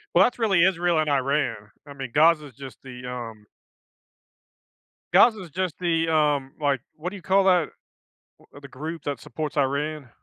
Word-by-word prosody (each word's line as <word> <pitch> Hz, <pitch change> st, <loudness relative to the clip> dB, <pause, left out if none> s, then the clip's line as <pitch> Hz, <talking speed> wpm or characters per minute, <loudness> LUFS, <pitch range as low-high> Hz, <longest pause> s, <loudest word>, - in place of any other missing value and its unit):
Well, -, -, +7 dB
that's 245 Hz, -, -2 dB
really 195 Hz, -6 st, +4 dB
Israel 175 Hz, -3 st, +2 dB
and 155 Hz, -1 st, 0 dB
Iran. 140 Hz, -2 st, +1 dB, 0.3 s
I 140 Hz, -, -9 dB
mean, 135 Hz, -3 st, -7 dB
Gaza 155 Hz, 0 st, +4 dB
is 130 Hz, -, -17 dB
just 135 Hz, -2 st, -11 dB
the, 125 Hz, -1 st, -10 dB
um 115 Hz, -4 st, -7 dB, 1.7 s
Gaza 220 Hz, -4 st, +5 dB
is 175 Hz, -, -10 dB
just 180 Hz, 0 st, -2 dB
the, 165 Hz, -2 st, 0 dB
um, 150 Hz, -4 st, +1 dB
like, 140 Hz, -4 st, 0 dB
what 170 Hz, +3 st, -5 dB
do 205 Hz, -, -10 dB
you 190 Hz, -, -10 dB
call 195 Hz, +1 st, +2 dB
that 180 Hz, -4 st, +3 dB, 0.9 s
uh, 145 Hz, -, -10 dB
the 140 Hz, -, -11 dB
group 155 Hz, +4 st, -7 dB
that 145 Hz, -4 st, -3 dB
supports 155 Hz, +4 st, -6 dB
Iran? 140 Hz, 0 st, -1 dB
150 Hz, 175 wpm, -24 LUFS, 135-170 Hz, 1.7 s, Well